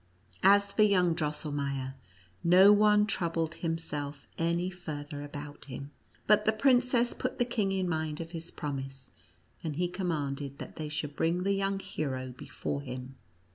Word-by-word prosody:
As 200 Hz, +1 st, +6 dB
for -, -, +2 dB
yonng 185 Hz, -5 st, +5 dB
Drosselmeier, 145 Hz, -3 st, -2 dB, 0.5 s
no 185 Hz, +4 st, +8 dB
one 210 Hz, 0 st, +5 dB
troubled 165 Hz, -5 st, 0 dB
himself 150 Hz, -4 st, -4 dB
any 170 Hz, +2 st, 0 dB
farther 150 Hz, -4 st, -6 dB
about 145 Hz, 0 st, -8 dB
him, 140 Hz, +1 st, -7 dB, 0.3 s
but 210 Hz, 0 st, +5 dB
the 220 Hz, -, +5 dB
princess 245 Hz, +1 st, +3 dB
put -, -, -3 dB
the 245 Hz, -, +2 dB
king 215 Hz, -5 st, 0 dB
in 190 Hz, -1 st, 0 dB
mind 155 Hz, -2 st, -2 dB
of 165 Hz, 0 st, -6 dB
his 165 Hz, -1 st, -4 dB
promise, 135 Hz, -3 st, -6 dB, 0.5 s
and 155 Hz, -3 st, -3 dB
he 175 Hz, +3 st, +1 dB
commanded 145 Hz, -7 st, -3 dB
that -, -, -9 dB
they 155 Hz, -1 st, -4 dB
should 150 Hz, -1 st, -3 dB
bring 170 Hz, +2 st, +1 dB
the 200 Hz, +1 st, +2 dB
young 195 Hz, 0 st, 0 dB
hero 130 Hz, -8 st, -4 dB
before 140 Hz, +1 st, -4 dB
him. 130 Hz, -1 st, -7 dB
165 Hz, 155 wpm, -30 LUFS, 145-195 Hz, 0.5 s, no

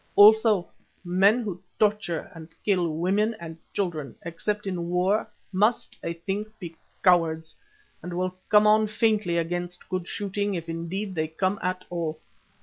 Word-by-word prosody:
Also 215 Hz, -2 st, +7 dB, 0.4 s
men 195 Hz, +6 st, +4 dB
who 190 Hz, -5 st, -5 dB, 0.2 s
torture 205 Hz, -6 st, 0 dB
and 165 Hz, -1 st, -10 dB, 0.2 s
kill 185 Hz, -4 st, +2 dB
women 195 Hz, +8 st, +1 dB
and 165 Hz, -1 st, -7 dB, 0.2 s
children, 160 Hz, -, -3 dB
except 205 Hz, +5 st, -3 dB
in 175 Hz, -3 st, -3 dB
war 185 Hz, +4 st, +1 dB, 0.2 s
must, 210 Hz, +5 st, +1 dB
I 170 Hz, -, -2 dB
think, 195 Hz, +5 st, -3 dB
be 170 Hz, -5 st, -8 dB, 0.3 s
cowards, 160 Hz, -3 st, +3 dB, 0.5 s
and 175 Hz, 0 st, -5 dB
will 185 Hz, 0 st, -1 dB, 0.2 s
come 210 Hz, 0 st, +6 dB
on 215 Hz, 0 st, +5 dB
faintly 215 Hz, -5 st, +1 dB
against 175 Hz, +1 st, -3 dB
good 185 Hz, -2 st, -2 dB
shooting, 205 Hz, 0 st, -2 dB
if 165 Hz, -1 st, -5 dB
indeed 170 Hz, +5 st, -4 dB
they 155 Hz, -2 st, -1 dB
come 185 Hz, +5 st, -1 dB
at 185 Hz, 0 st, -2 dB
all. 160 Hz, -3 st, -3 dB
185 Hz, 145 wpm, -26 LUFS, 170-205 Hz, 0.5 s, Also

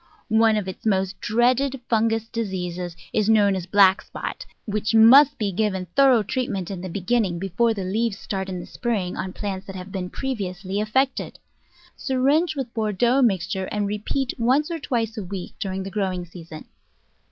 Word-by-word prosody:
One 220 Hz, 0 st, +4 dB
of 205 Hz, -3 st, -2 dB
its 190 Hz, -, -7 dB
most 195 Hz, -2 st, 0 dB
dreaded 255 Hz, +4 st, +2 dB
fungous 225 Hz, 0 st, +1 dB
diseases 180 Hz, -6 st, -4 dB, 0.2 s
is 215 Hz, -1 st, +1 dB
known 205 Hz, -3 st, +4 dB
as 185 Hz, -2 st, -4 dB
"black 195 Hz, 0 st, +5 dB
spot," -, -, -7 dB, 0.2 s
which 215 Hz, +1 st, -1 dB
must 255 Hz, +6 st, +7 dB
be 205 Hz, -3 st, -1 dB
given 190 Hz, -1 st, -1 dB
thorough 265 Hz, -5 st, +5 dB
treatment 205 Hz, -5 st, -3 dB
in 185 Hz, -3 st, -5 dB
the 185 Hz, -, -5 dB
begin 205 Hz, +7 st, +1 dB
ning, 180 Hz, -5 st, -2 dB
before 195 Hz, +6 st, 0 dB
the 195 Hz, -, -3 dB
leaves 210 Hz, +3 st, -1 dB
start 190 Hz, -2 st, -4 dB
in 185 Hz, -1 st, -4 dB
the -, -, -7 dB
spring 210 Hz, -7 st, -2 dB
on 190 Hz, -, -4 dB
plants 195 Hz, -1 st, -5 dB
that 195 Hz, -, -8 dB
have 185 Hz, +1 st, -8 dB
been 185 Hz, -2 st, -4 dB
previously 195 Hz, -6 st, -3 dB
affected. 260 Hz, +6 st, 0 dB, 0.6 s
Syringe 285 Hz, +5 st, +1 dB
with 265 Hz, -4 st, -4 dB
Bordeaux 235 Hz, +4 st, +1 dB
mixture 190 Hz, -4 st, +1 dB
and 205 Hz, +1 st, -2 dB
repeat 210 Hz, +6 st, -2 dB
once 270 Hz, +7 st, +2 dB
or 330 Hz, -, -3 dB
twice 230 Hz, -5 st, -2 dB
a -, -, -4 dB
week 185 Hz, 0 st, -6 dB
during 190 Hz, -1 st, -3 dB
the 195 Hz, -, -7 dB
growing 185 Hz, -3 st, -2 dB
season. 165 Hz, -2 st, -11 dB
210 Hz, 175 wpm, -23 LUFS, 190-235 Hz, 0.6 s, must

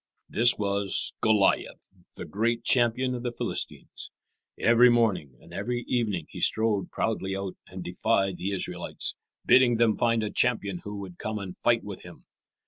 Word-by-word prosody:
This 120 Hz, +1 st, +3 dB
was 100 Hz, -1 st, -1 dB
Goliath, 110 Hz, -3 st, +1 dB, 0.2 s
the -, -, -6 dB
great 115 Hz, +6 st, -1 dB
champion 125 Hz, +1 st, +3 dB
of 125 Hz, -, -4 dB
the 120 Hz, 0 st, -3 dB
Philistines. -, -, -4 dB, 0.5 s
Every 120 Hz, +2 st, +6 dB
morning 105 Hz, -, +1 dB
and 85 Hz, +1 st, -16 dB
every 120 Hz, +5 st, -3 dB
evening 105 Hz, -10 st, -1 dB
he -, -, -8 dB
strode 110 Hz, -3 st, +2 dB
proudly 95 Hz, -4 st, -2 dB
out 95 Hz, -1 st, -5 dB
and 95 Hz, -1 st, -8 dB
defied 95 Hz, +1 st, 0 dB
the 95 Hz, -, -3 dB
Israelites, 100 Hz, -2 st, -2 dB, 0.3 s
bidding 125 Hz, -2 st, +5 dB
them 115 Hz, -2 st, +3 dB
find 115 Hz, -1 st, +1 dB
a 105 Hz, -, -3 dB
champion 100 Hz, -7 st, 0 dB
who 105 Hz, +2 st, -7 dB
would 90 Hz, -3 st, -10 dB
come 110 Hz, 0 st, -3 dB
and 95 Hz, -3 st, -7 dB
fight -, -, +1 dB
with -, -, -8 dB
him. -, -, -14 dB
110 Hz, 160 wpm, -27 LUFS, 95-120 Hz, 0.5 s, Every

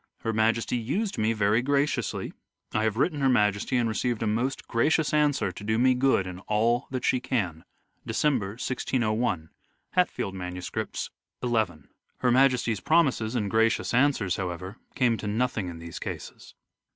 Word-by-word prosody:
Her 115 Hz, -, -1 dB
Majesty 115 Hz, +2 st, +1 dB
used 165 Hz, -, -2 dB
me 110 Hz, +1 st, +2 dB
very 105 Hz, +1 st, +2 dB
graciously... 140 Hz, +2 st, 0 dB, 0.4 s
I 110 Hz, 0 st, +1 dB
have 110 Hz, 0 st, 0 dB
written 145 Hz, +2 st, +1 dB
Her 135 Hz, -, +4 dB
Majesty 105 Hz, 0 st, +2 dB
and 120 Hz, -1 st, +2 dB
received 115 Hz, +1 st, -1 dB
a -, -, 0 dB
most 120 Hz, +5 st, -1 dB
gracious 150 Hz, +7 st, +2 dB
answer 145 Hz, -10 st, +2 dB
to 90 Hz, -, -10 dB
do 110 Hz, +1 st, 0 dB
me 130 Hz, +2 st, +4 dB
good 125 Hz, -6 st, +2 dB
in 90 Hz, -1 st, -7 dB
all 115 Hz, +4 st, +1 dB
that 130 Hz, -1 st, -3 dB
she 130 Hz, -, +3 dB
can." 90 Hz, -12 st, -2 dB, 0.4 s
December, 120 Hz, -10 st, 0 dB
1601. 115 Hz, -7 st, -1 dB, 0.4 s
(Hatfield 180 Hz, -, 0 dB
MSS., 90 Hz, -1 st, -6 dB, 0.7 s
XL) 120 Hz, -1 st, +1 dB, 0.6 s
Her 125 Hz, -, +2 dB
Majesty's 125 Hz, -4 st, +3 dB
promises 130 Hz, -, +2 dB
and 105 Hz, -5 st, -1 dB
gracious 115 Hz, +1 st, +2 dB
answers, 125 Hz, -8 st, +2 dB
however, 95 Hz, +2 st, -5 dB, 0.2 s
came 120 Hz, -4 st, +2 dB
to 105 Hz, -, -5 dB
nothing 110 Hz, -2 st, -1 dB
in 85 Hz, -1 st, -6 dB
these 85 Hz, 0 st, -8 dB
cases. -, -, -8 dB
115 Hz, 155 wpm, -27 LUFS, 105-130 Hz, 0.7 s, Her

